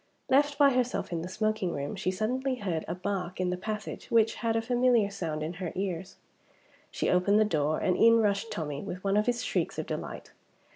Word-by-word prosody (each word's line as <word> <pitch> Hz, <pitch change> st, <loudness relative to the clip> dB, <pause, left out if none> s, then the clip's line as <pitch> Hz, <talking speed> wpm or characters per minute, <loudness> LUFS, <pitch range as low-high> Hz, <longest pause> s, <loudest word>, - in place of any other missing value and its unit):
Left 285 Hz, +2 st, +3 dB
by 280 Hz, -1 st, +6 dB
herself 250 Hz, -5 st, -1 dB
in 170 Hz, -1 st, -2 dB
the 175 Hz, -, -5 dB
smoking 215 Hz, -2 st, -1 dB
room, 140 Hz, +7 st, -4 dB
she 190 Hz, -1 st, -1 dB
suddenly 255 Hz, +7 st, -1 dB
heard 180 Hz, -9 st, -2 dB
a -, -, -3 dB
bark 185 Hz, -1 st, -3 dB
in 180 Hz, -1 st, 0 dB
the -, -, 0 dB
passage 210 Hz, +3 st, -5 dB
which 225 Hz, -1 st, +4 dB
had 230 Hz, -1 st, +1 dB
a 225 Hz, -, +2 dB
familiar 245 Hz, -3 st, +3 dB
sound 155 Hz, -5 st, -3 dB
in 160 Hz, +3 st, -3 dB
her 175 Hz, -, -2 dB
ears. 190 Hz, -1 st, -3 dB, 0.7 s
She -, -, -2 dB
opened 190 Hz, +4 st, +3 dB
the 215 Hz, -, +5 dB
door 155 Hz, -5 st, +1 dB
and 185 Hz, -, +1 dB
in 230 Hz, +3 st, +6 dB
rushed 210 Hz, +1 st, +1 dB
Tommie, 150 Hz, -3 st, -4 dB
with 185 Hz, -2 st, -6 dB
one 195 Hz, 0 st, +1 dB
of 210 Hz, +2 st, +2 dB
his 245 Hz, 0 st, 0 dB
shrieks -, -, -1 dB
of -, -, -2 dB
delight! -, -, -6 dB
200 Hz, 210 wpm, -29 LUFS, 180-230 Hz, 0.7 s, by